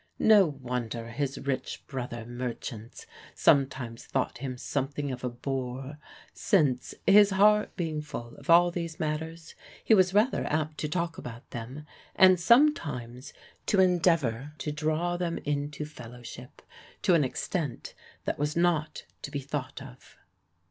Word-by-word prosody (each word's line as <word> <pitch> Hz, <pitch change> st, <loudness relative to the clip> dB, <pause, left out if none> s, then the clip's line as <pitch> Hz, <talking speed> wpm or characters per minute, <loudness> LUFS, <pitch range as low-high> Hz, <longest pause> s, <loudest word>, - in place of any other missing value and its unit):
No 210 Hz, -4 st, +6 dB
wonder 125 Hz, -5 st, -4 dB
his 140 Hz, +2 st, -2 dB
rich 135 Hz, -2 st, -3 dB
brother 120 Hz, -4 st, -5 dB
merchants 120 Hz, -2 st, -6 dB, 0.3 s
sometimes 130 Hz, -4 st, +2 dB
thought 130 Hz, -2 st, -2 dB
him 130 Hz, -1 st, -4 dB
something 140 Hz, +2 st, -3 dB
of 130 Hz, 0 st, -6 dB
a 125 Hz, -, 0 dB
bore, 130 Hz, +3 st, -5 dB, 0.3 s
since, 145 Hz, -10 st, +1 dB
his 205 Hz, +1 st, +7 dB
heart 210 Hz, +2 st, +4 dB
being 160 Hz, -4 st, -2 dB
full 120 Hz, -6 st, -8 dB
of -, -, -15 dB
all 175 Hz, +1 st, +7 dB
these 170 Hz, -1 st, -5 dB
matters, 160 Hz, +1 st, -4 dB, 0.3 s
he -, -, +4 dB
was 185 Hz, -3 st, +5 dB
rather 210 Hz, +6 st, +2 dB
apt 155 Hz, 0 st, -2 dB
to 150 Hz, -, -2 dB
talk 170 Hz, 0 st, -2 dB
about 120 Hz, -1 st, -9 dB
them, 125 Hz, +6 st, -7 dB, 0.3 s
and 185 Hz, -2 st, +7 dB
sometimes 160 Hz, -, +2 dB, 0.4 s
to 200 Hz, -, +3 dB
endeavor 165 Hz, -8 st, +2 dB
to 150 Hz, -, -3 dB
draw 155 Hz, +4 st, -1 dB
them 175 Hz, -1 st, -2 dB
into 145 Hz, +1 st, -2 dB
fellowship, 125 Hz, -1 st, -11 dB, 0.4 s
to 185 Hz, -, +4 dB
an 165 Hz, -3 st, +4 dB
extent 140 Hz, +1 st, -3 dB, 0.3 s
that -, -, -2 dB
was 150 Hz, +2 st, -1 dB
not 165 Hz, -3 st, +1 dB, 0.2 s
to -, -, -5 dB
be 145 Hz, -1 st, -3 dB
thought 135 Hz, 0 st, -5 dB
of. 130 Hz, -1 st, -15 dB
145 Hz, 140 wpm, -28 LUFS, 125-170 Hz, 0.4 s, his